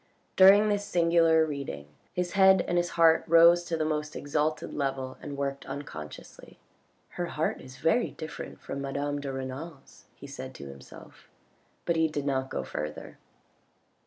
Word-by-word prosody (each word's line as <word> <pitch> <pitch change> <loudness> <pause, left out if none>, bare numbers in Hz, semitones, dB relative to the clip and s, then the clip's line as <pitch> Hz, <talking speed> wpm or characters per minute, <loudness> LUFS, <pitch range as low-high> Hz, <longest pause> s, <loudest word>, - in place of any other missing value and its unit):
During 195 +3 +7
this 205 -1 0
singular 165 -3 +3
reading 140 - -5 0.3
his 180 0 -2
head 190 0 +5
and 175 - -1
his 175 0 -1
heart 165 -1 +5
rose 170 +1 +6
to 165 - -2
the 155 - -1
most 150 -1 -2
exalted 150 +2 -2
level 135 -2 -3
and 145 -1 -7
worked 140 0 -3
un 140 +2 -5
consciously. 75 - -11 0.3
" - - -41
Her 175 - -1
heart 160 -1 -2
is 130 0 -12
very 225 - +2
different 155 0 -8
from 140 - -6
madame 145 +1 -3
de 140 -1 -4
Renal's," 135 +3 -8
he - - -12
said 130 -2 -8
to - - -9
himself, 70 0 -13 0.6
but 170 - +1
he 160 0 +3
did 150 -2 -4
not 135 -1 -1
go - - -3
further. - - -6
150 Hz, 165 wpm, -28 LUFS, 135-170 Hz, 0.6 s, During